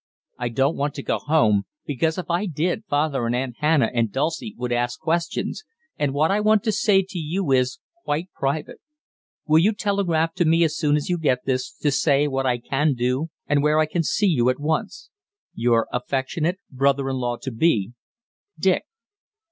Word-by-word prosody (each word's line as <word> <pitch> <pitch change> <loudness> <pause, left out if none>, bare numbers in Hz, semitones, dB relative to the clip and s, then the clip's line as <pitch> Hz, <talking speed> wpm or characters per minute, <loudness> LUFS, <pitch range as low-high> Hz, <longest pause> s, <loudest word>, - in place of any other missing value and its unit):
I 120 -1 -1
don't 135 +6 +1
want 145 0 -2
to - - -6
go - - -1
home, 110 -10 +2 0.2
because 160 +4 -1
if 185 - -4
I 175 +4 0
did 175 +6 -2
father 145 -4 0
and 120 - 0
Aunt 125 -1 -3
Hannah 150 -6 +3
and 115 -3 +1
Dulcie 160 - -2
would 125 0 -3
ask 120 0 -1
questions, 170 - -2 0.3
and 145 -2 0
what 150 +5 +2
I 200 - +2
want 215 0 +3
to 225 - +1
say 200 -2 +3
to 185 - -5
you 165 +1 -2
is 130 +4 +2 0.3
quite 160 +6 -2
private. 140 +3 -3 0.7
Will 155 +1 +5
you 205 +7 +3
telegraph 180 -6 0
to - - +3
me 165 +2 +4
as 160 -1 +1
soon 150 -2 +2
as 150 - -1
you 175 -1 0
get 130 -5 0
this 130 -1 -1
to 145 - -1
say 140 +1 +2
what 135 -1 -1
I 125 -1 +2
can 140 +4 0
do 125 +6 -1 0.2
and 145 -1 +2
where 150 +1 +3
I 155 - +4
can 160 +3 -1
see 210 +6 0
you 130 -10 +3
at 130 - -1
once? 155 +2 -3 0.4
"Your 115 -1 +2
affectionate 135 +7 -1
brother 135 +1 +1
in 135 -1 -1
law 120 -1 -2
to 135 - -6
be, 115 - +1 0.6
"DICK." - - +1
145 Hz, 195 wpm, -23 LUFS, 130-165 Hz, 0.7 s, Will